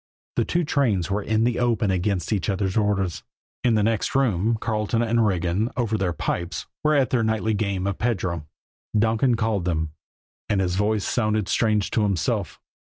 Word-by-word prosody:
The - - +1
two 175 0 0
trains 115 - +1
were 105 +2 0
in 110 +2 +1
the 120 0 +1
open 115 -4 +1
against 95 +1 0
each 95 -4 -1
other's 95 -1 -1
orders. 100 -5 0 0.4
In 120 -2 +3
the 105 - +2
next 110 +3 0
room, 115 -4 +2
Carleton 110 +1 0
and 115 0 +2
Regan, 90 +3 0
over 115 -3 0
their 95 -4 0
pipes, 85 +1 -3 0.2
were 155 0 +3
at 135 -3 +2
their 125 - +2
nightly 110 0 0
game 100 -3 -1
of 100 -2 -2
pedro. 95 -9 -1 0.5
Donkin 115 +3 +3
called 110 -5 0
them 80 -3 -1 0.6
and 100 - +2
his 90 -2 0
voice 105 +2 +1
sounded 110 -4 0
strange 105 -2 +1
to 110 - +1
himself. 95 -8 -1
105 Hz, 175 wpm, -24 LUFS, 95-115 Hz, 0.6 s, In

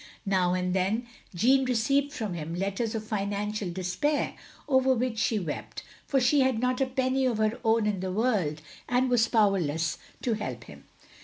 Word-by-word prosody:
Now 185 -2 +2
and 180 0 -1
then 195 +6 0 0.3
Jeanne 260 +8 +4
received 270 +4 +1
from 220 -9 -4
him 165 0 -5
letters 200 +5 -2
of 220 - -3
financial 205 -1 -2
despair, 185 - -1 0.3
over 260 -2 +3
which 240 -2 -1
she 220 +1 +1
wept, 170 -7 -5 0.2
for 275 - +2
she 265 +3 +3
had 260 -3 +3
not 255 +2 0
a 265 - +2
penny 260 0 +1
of 235 -3 0
her 215 +1 0
own 225 -1 +3
in 210 -3 0
the 185 0 -3
world, 185 -9 0 0.3
and 250 +1 +2
was 235 -2 +4
powerless 170 -7 +1 0.2
to 240 - +1
help 130 - -4
him. 70 -7 -14
215 Hz, 175 wpm, -28 LUFS, 185-255 Hz, 0.3 s, Jeanne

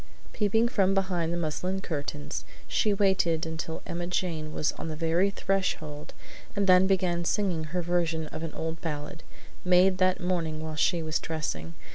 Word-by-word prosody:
Peeping 225 +2 +2
from 195 -5 +2
behind 180 -4 0
the 170 - -1
muslin 175 +4 -1
curtains, 145 - -4 0.2
she 215 - +2
waited 190 -5 +2
until 160 0 -5
Emma 175 0 -3
Jane 165 -4 -2
was 150 - 0
on - - -7
the 155 - -3
very 165 +4 +2
threshold 185 -7 -2 0.4
and 200 -1 +2
then 185 0 +6
began 180 -3 +1
singing 175 -3 0
her 175 +3 -2
version 165 -2 0
of 155 - -6
an 165 -2 -5
old 160 0 -4
ballad, 155 +1 -4 0.4
made 185 +1 +4
that 185 0 +3
morning 170 -4 -1
while 160 0 -4
she 165 +2 +2
was 155 -1 0
dressing. 85 - -4
170 Hz, 165 wpm, -28 LUFS, 160-185 Hz, 0.4 s, then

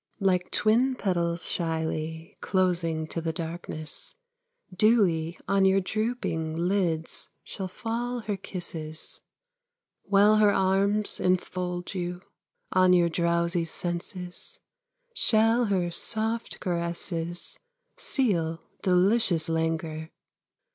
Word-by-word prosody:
Like 185 -3 +1
twin 245 +5 +2
petals 170 -5 0
shyly 160 -1 -2
Closing 170 -4 +1
to 165 +1 -4
the 165 0 -1
darkness, 165 - -5 0.6
Dewy 180 -6 +3
on 195 -1 +3
your 190 0 +5
drooping 195 -6 -2
Lids 170 -2 0
shall 190 - -5
fall 240 +5 -3
her 210 -2 -2
kisses. 160 -4 -5 0.8
While 200 +2 +4
her 210 -1 +5
arms 200 +2 +1
enfold 180 0 -1
you, 180 -1 -4 0.5
On 185 0 +5
your 175 -1 +4
drowsy 170 +1 +1
senses 175 +2 -3 0.5
Shall 225 - +4
her 185 -4 0
soft 220 +5 -1
caresses 170 -1 -2 0.4
Seal 185 - +1 0.2
delicious 185 -2 +3
languor. 160 -1 -1
180 Hz, 95 wpm, -27 LUFS, 165-205 Hz, 0.8 s, your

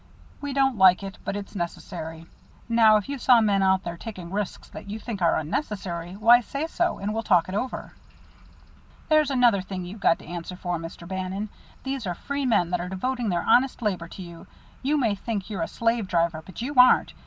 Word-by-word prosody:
We 285 -1 -4
don't 270 -4 +1
like 185 0 +6
it, 195 0 -7
but - - -3
it's 205 0 -7
necessary. 165 -2 -5 0.4
Now, 225 -2 +6
if 210 - -4
you 280 -1 -4
saw 250 -1 +6
men 205 -3 +2
out 190 0 +3
there 170 -1 -5
taking 185 -5 -8
risks 205 0 -4
that - - -10
you 210 - -4
think 220 -3 -6
are 170 - +3
unnecessary, 175 - -3
why, 230 +5 +6
say 280 +6 -4
so, 345 +1 -1
and 205 +2 -3
we'll 225 - -1
talk 180 -6 +3
it 185 - -6
over." 250 +6 -4 1.2
"There's 310 -2 +4
another 245 -7 +4
thing 185 -1 -6
you've 195 +5 -8
got 165 - +3
to - - -15
answer 175 +2 -6
for, 175 -2 -3
Mr. 165 +1 -9
Bannon. 190 +3 -4 0.3
These 265 -5 -3
are 175 - -2
free 280 +7 -3
men 195 -7 +2
that 180 -1 0
are 180 - -5
devoting 240 +5 -2
their 175 -2 0
honest 250 +1 +3
labor 185 -6 -1
to 185 - -9
you. 170 -1 -11 0.3
You 290 +3 +1
may 235 -7 +2
think 205 0 -4
you're 195 -5 -3
a 165 - -1
slave 230 -2 0
driver, 170 -3 0
but 190 +6 -8
you 280 +4 -3
aren't. 250 0 +6
200 Hz, 210 wpm, -25 LUFS, 180-240 Hz, 1.2 s, like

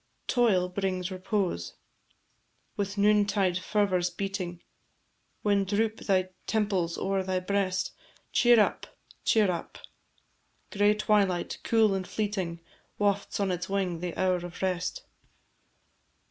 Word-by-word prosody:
Toil 215 -8 +3
brings 185 0 -2
repose: 185 - -2 1.0
With 200 0 -3
noontide 200 -3 +3
fervours 185 -3 +1
beating, 180 -1 -4 0.8
When 205 -1 +3
droop 215 +3 0
thy 185 -2 +1 0.2
temples 195 -6 0
o'er 195 0 0
thy 185 0 -1
breast, 190 0 -1 0.4
Cheer 240 -1 +5
up, 210 - 0 0.3
cheer 210 -4 +4
up; 170 - -6 0.9
Gray 205 +1 +3
twilight, 200 -4 +1
cool 220 -3 +3
and 190 -1 -2
fleeting, 190 -6 -2 0.4
Wafts 200 -1 0
on 195 -2 +1
its 180 +1 -3
wing 190 -4 -1
the 175 -1 -5
hour 185 -1 +3
of 175 -1 -8
rest. 180 -2 -1
195 Hz, 115 wpm, -28 LUFS, 180-205 Hz, 1.0 s, Cheer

